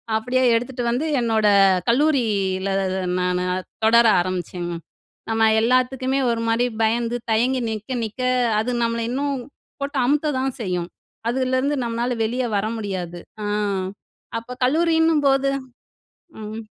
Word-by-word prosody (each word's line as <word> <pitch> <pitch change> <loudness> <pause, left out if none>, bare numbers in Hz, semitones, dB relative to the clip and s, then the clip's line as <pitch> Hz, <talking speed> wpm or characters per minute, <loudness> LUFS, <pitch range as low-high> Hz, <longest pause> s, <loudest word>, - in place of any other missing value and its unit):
அப்டியே 250 +4 +1
எடுத்துட்டு 245 +1 -2
வந்து 250 +7 0
என்னோட 220 -3 +2 0.4
கல்லூரியில 220 -9 +1 0.2
ந 190 - -2 0.2
நானு 180 0 0 0.4
தொடர 235 +1 +6 0.2
ஆரம்பிச்சேங்க. 175 -1 -4 0.6
நம்ம 225 0 +3
எல்லாத்துக்குமே 255 +2 +1
ஒரு 230 -1 0
மாரி 230 +2 +2 0.2
பயந்து, 230 +2 +1 0.2
தயங்கி 250 +3 +2
நிக்க, 220 +4 -4
நிக்க 225 +3 -5 0.4
அது 245 +3 -1
நம்மள 230 0 0
இன்னும் 280 +1 -1 0.4
போட்டு 280 0 -3
அமுக்க 295 +3 +1
தான் 265 0 -2
செய்யும். 180 -3 -2 0.4
அதுலருந்து 260 +3 0
நம்மளால 235 +1 -2
வெளிய 245 +3 -1
வர 200 - 0
முடியாது. 185 -5 -4 0.2
அ - - -3 0.9
அப்போ 230 +2 -9
கல்லூரின்னும் 320 +1 +3
போது 275 0 +3 0.9
ம். 215 +1 -6
235 Hz, 120 wpm, -22 LUFS, 215-265 Hz, 0.9 s, தொடர